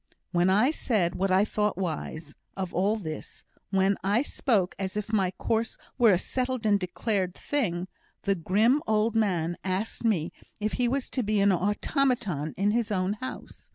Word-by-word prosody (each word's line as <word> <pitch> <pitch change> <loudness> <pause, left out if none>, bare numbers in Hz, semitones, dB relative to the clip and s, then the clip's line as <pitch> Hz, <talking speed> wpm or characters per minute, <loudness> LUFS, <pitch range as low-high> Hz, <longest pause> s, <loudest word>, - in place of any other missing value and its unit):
when 175 +1 +3
I 215 +9 +4
said 205 - 0
what 195 +1 0
I 190 +2 +4
thought 210 -2 -1
wise, 160 -4 -4 0.2
of 185 -2 -3
all 200 +5 +2
this 155 -7 -7 0.3
when 195 0 +2
I 205 +7 +2
spoke 210 -10 +1
as 190 +1 -3
if 210 +1 -4
my 195 -4 +3
course 225 +4 -1 0.2
were 235 -2 +7
a 185 - +5
settled 255 +4 -2
and 205 -1 +4
decided 185 0 -1
thing, 185 -11 -1 0.4
the 200 - +2
grim 210 - +2
old 215 +1 +2
man 175 -7 +1
asked 190 +6 -2
me 185 -8 +1 0.3
if 215 0 -1
he 245 - +3
was 265 +2 -1
to 260 - 0
be 215 -2 +1
an 200 0 +5
automaton 205 - 0
in 200 +2 +2
his 230 -1 0
own 185 0 +1
house. 255 +5 -8
200 Hz, 175 wpm, -27 LUFS, 185-225 Hz, 0.4 s, were